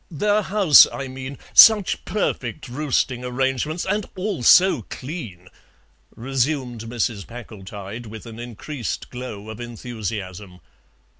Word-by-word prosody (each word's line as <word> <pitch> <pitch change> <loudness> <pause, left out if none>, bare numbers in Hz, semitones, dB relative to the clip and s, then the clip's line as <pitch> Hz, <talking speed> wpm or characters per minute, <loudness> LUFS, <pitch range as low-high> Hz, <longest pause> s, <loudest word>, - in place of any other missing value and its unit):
"Their 205 +6 +1
house, 190 -7 +7
I 135 - -5
mean; 130 +1 -7 0.2
such 215 -4 +7
perfect 130 - -3
roosting 125 -2 -1
arrangements, 135 +6 -1
and 205 +1 -1
all 190 -6 -3
so 180 +2 +6
clean," 120 - -7 0.7
resumed 130 -1 -2
Mrs. 115 -3 -3
Packletide, 110 -1 -9
with 110 +1 -10
an 115 -1 -10
increased 120 +2 -6
glow 125 -5 -7
of 110 - -10
enthusiasm. 105 -6 -6
125 Hz, 115 wpm, -22 LUFS, 110-150 Hz, 0.7 s, house